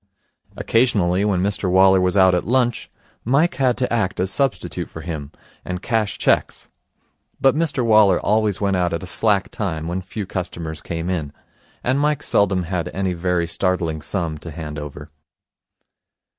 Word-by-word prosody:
Occasionally, 100 Hz, -6 st, +2 dB
when 95 Hz, -3 st, +1 dB
Mr 100 Hz, -1 st, -1 dB
Waller 95 Hz, +1 st, +5 dB
was 90 Hz, +1 st, +1 dB
out 95 Hz, -1 st, +6 dB
at 90 Hz, -, -1 dB
lunch, 120 Hz, -1 st, +1 dB, 0.3 s
Mike 140 Hz, +8 st, +2 dB
had 125 Hz, -2 st, +3 dB
to 125 Hz, -2 st, -1 dB
act 105 Hz, -5 st, -1 dB
as 95 Hz, +1 st, 0 dB
substitute 135 Hz, +3 st, -2 dB
for 80 Hz, -, -9 dB
him, 75 Hz, -3 st, -6 dB, 0.3 s
and 90 Hz, 0 st, -4 dB
cash 110 Hz, -4 st, 0 dB
cheques; -, -, 0 dB, 0.7 s
but 135 Hz, +1 st, +4 dB
Mr 155 Hz, -6 st, 0 dB
Waller 105 Hz, -5 st, +5 dB
always 105 Hz, -2 st, +1 dB
went 100 Hz, -2 st, +1 dB
out 90 Hz, -1 st, 0 dB
at 85 Hz, -, -3 dB
a -, -, -5 dB
slack 100 Hz, +2 st, +1 dB
time, 80 Hz, -6 st, -3 dB
when 90 Hz, +2 st, -2 dB
few 100 Hz, +3 st, -6 dB
customers 85 Hz, -4 st, -5 dB
came 85 Hz, 0 st, -4 dB
in, 80 Hz, -6 st, -2 dB, 0.5 s
and 130 Hz, +3 st, +1 dB
Mike 150 Hz, 0 st, 0 dB
seldom 95 Hz, -3 st, +2 dB
had 85 Hz, 0 st, -3 dB
any 95 Hz, -1 st, -1 dB
very 90 Hz, 0 st, 0 dB
startling 85 Hz, -3 st, 0 dB
sum 80 Hz, -2 st, -3 dB
to 85 Hz, -, -8 dB
hand 75 Hz, -1 st, -6 dB
over. 75 Hz, 0 st, -9 dB
95 Hz, 165 wpm, -21 LUFS, 85-110 Hz, 0.7 s, out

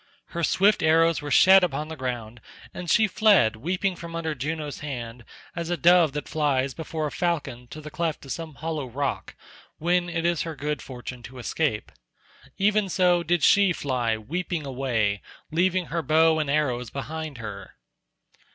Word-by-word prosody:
Her 170 Hz, -1 st, -4 dB
swift 200 Hz, +6 st, +3 dB
arrows 165 Hz, +1 st, +3 dB
were 145 Hz, -, -5 dB
shed 190 Hz, +5 st, +7 dB
upon 155 Hz, -3 st, -1 dB
the 160 Hz, -, -7 dB
ground, 120 Hz, -4 st, -5 dB, 0.3 s
and 175 Hz, -1 st, -6 dB
she 220 Hz, -, +5 dB
fled 200 Hz, -, +4 dB
weeping 180 Hz, -, -1 dB
from 170 Hz, -1 st, -8 dB
under 160 Hz, -1 st, -2 dB
Juno's 150 Hz, +1 st, -4 dB
hand 120 Hz, -5 st, -6 dB, 0.3 s
as 170 Hz, -1 st, -4 dB
a 175 Hz, -, 0 dB
dove 170 Hz, -4 st, +5 dB
that 150 Hz, -, -4 dB
flies 140 Hz, -3 st, 0 dB
before 160 Hz, 0 st, -4 dB
a 150 Hz, -, -3 dB
falcon 140 Hz, -8 st, -2 dB
to 155 Hz, -, -9 dB
the 150 Hz, 0 st, -9 dB
cleft 165 Hz, -3 st, -3 dB
of 135 Hz, -, -8 dB
some 160 Hz, -3 st, -6 dB
hollow 155 Hz, -3 st, -4 dB
rock, 135 Hz, +3 st, -3 dB, 0.4 s
when 175 Hz, +2 st, +1 dB
it 165 Hz, -1 st, -2 dB
is 170 Hz, -2 st, +1 dB
her 165 Hz, -2 st, -4 dB
good 150 Hz, +1 st, -3 dB
fortune 125 Hz, -1 st, -8 dB
to 120 Hz, +3 st, -11 dB
escape. 125 Hz, -2 st, -2 dB, 0.7 s
Even 205 Hz, 0 st, +2 dB
so 180 Hz, -1 st, +3 dB
did 170 Hz, -1 st, 0 dB
she 200 Hz, -3 st, +5 dB
fly 125 Hz, -7 st, -1 dB
weeping 165 Hz, -, -4 dB
away, 120 Hz, -7 st, -1 dB, 0.3 s
leaving 180 Hz, +2 st, +1 dB
her 170 Hz, -, 0 dB
bow 160 Hz, +2 st, +3 dB
and 150 Hz, -2 st, -1 dB
arrows 130 Hz, -5 st, 0 dB
behind 155 Hz, +2 st, -6 dB
her. 105 Hz, -4 st, -8 dB
155 Hz, 170 wpm, -25 LUFS, 130-170 Hz, 0.7 s, shed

